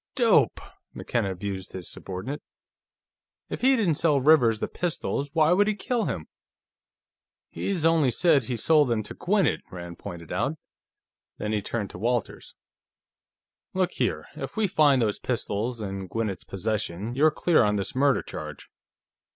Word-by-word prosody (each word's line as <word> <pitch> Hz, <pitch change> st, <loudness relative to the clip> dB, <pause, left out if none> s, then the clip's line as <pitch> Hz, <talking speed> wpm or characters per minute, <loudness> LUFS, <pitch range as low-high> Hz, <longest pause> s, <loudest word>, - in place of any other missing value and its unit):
"Dope!" -, -, +4 dB, 0.4 s
McKenna 110 Hz, -5 st, -1 dB
abused 95 Hz, 0 st, -5 dB
his 90 Hz, -3 st, -6 dB
subordinate. 95 Hz, +10 st, -6 dB, 1.1 s
"If -, -, -4 dB
he 265 Hz, +2 st, +5 dB
didn't 185 Hz, -, +1 dB
sell 150 Hz, -4 st, +3 dB
Rivers 130 Hz, -6 st, +5 dB
the -, -, -2 dB
pistols, 155 Hz, -4 st, -2 dB
why 160 Hz, -1 st, +4 dB
would 205 Hz, +3 st, +4 dB
he 215 Hz, -, +1 dB
kill 235 Hz, +3 st, -1 dB
him?" -, -, -3 dB, 1.3 s
"He's 180 Hz, -5 st, -2 dB
only 165 Hz, -4 st, +4 dB
said 145 Hz, 0 st, +3 dB
he 125 Hz, -1 st, -3 dB
sold 150 Hz, +4 st, +4 dB
them 115 Hz, -3 st, 0 dB
to -, -, -9 dB
Gwinnett," 195 Hz, -2 st, +1 dB
Rand 85 Hz, -1 st, -8 dB
pointed 85 Hz, -5 st, -8 dB
out. 135 Hz, +12 st, -1 dB, 0.8 s
Then 105 Hz, -, -3 dB
he 105 Hz, -1 st, 0 dB
turned 105 Hz, -1 st, -3 dB
to -, -, -9 dB
Walters. 120 Hz, +1 st, -2 dB, 1.2 s
"Look 185 Hz, -1 st, +1 dB
here; -, -, -1 dB
if -, -, -7 dB
we 220 Hz, -, +3 dB
find 145 Hz, -8 st, +4 dB
those 105 Hz, -2 st, -1 dB
pistols 115 Hz, 0 st, -2 dB
in 95 Hz, -2 st, -5 dB
Gwinnett's 110 Hz, -2 st, -3 dB
possession, 105 Hz, +1 st, -3 dB
you're 150 Hz, +5 st, +5 dB
clear 170 Hz, +1 st, +3 dB
on 105 Hz, -2 st, +2 dB
this 100 Hz, -1 st, -2 dB
murder 140 Hz, +1 st, +2 dB
charge. -, -, -8 dB
125 Hz, 150 wpm, -26 LUFS, 100-160 Hz, 1.3 s, he